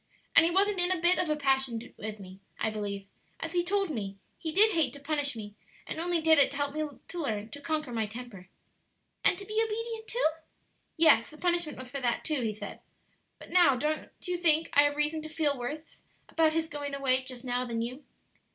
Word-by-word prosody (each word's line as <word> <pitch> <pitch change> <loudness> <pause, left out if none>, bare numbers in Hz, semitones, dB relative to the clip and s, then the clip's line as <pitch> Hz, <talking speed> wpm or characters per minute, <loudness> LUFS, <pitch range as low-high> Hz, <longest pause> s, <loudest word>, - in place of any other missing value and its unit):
"And 330 - +9
he - - +2
wasn't 390 +2 +2
in 355 0 +4
a 370 - 0
bit 345 +2 +4
of 355 - 0
a 305 - +2
passion 265 -5 0
with 215 0 -6
me. 190 0 -11 0.2
I 220 - 0
believe, 200 -2 -4 0.3
as 325 +1 -4
he 350 -1 +2
told 390 -1 0
me, 200 -7 -4 0.2
he 320 - -3
did 420 +6 +6
hate 320 -8 +1
to 285 - -9
punish 285 -2 -1
me, 210 -2 -7 0.3
and - - -5
only 345 0 +1
did 320 -1 +6
it 280 - +7
to 280 - -6
help 285 -1 -1
me 305 -2 -4
to 350 - -5
learn 215 -8 -3
to 285 - -8
conquer 305 -5 -2
my 220 -2 -1
temper." 215 -5 -10 0.7
"And 360 - +5
to 395 - -6
be 430 +2 0
obedient, 450 0 -4
too?" 480 -3 +2 0.7
"Yes; 300 -9 +5
the 305 - -13
punishment 345 -2 0
was 255 -1 -9
for 275 - -4
that 240 -2 0
too, 305 -4 0
he 220 -3 -2
said. 215 - -8 0.6
But - - -13
now 345 -7 +6
don't 305 +4 -2
you 360 -1 -2
think 325 -2 +3
I 285 - +7
have 290 0 +1
reason 300 +1 0
to 310 - -7
feel 310 -2 0
worse 290 +6 -7 0.3
about 320 -1 +2
his 325 0 0
going 290 -2 -5
away 260 -2 +2
just 255 -1 -6
now 245 0 0
than 230 -2 -2
you?" 255 +5 -6
295 Hz, 225 wpm, -29 LUFS, 245-330 Hz, 0.7 s, And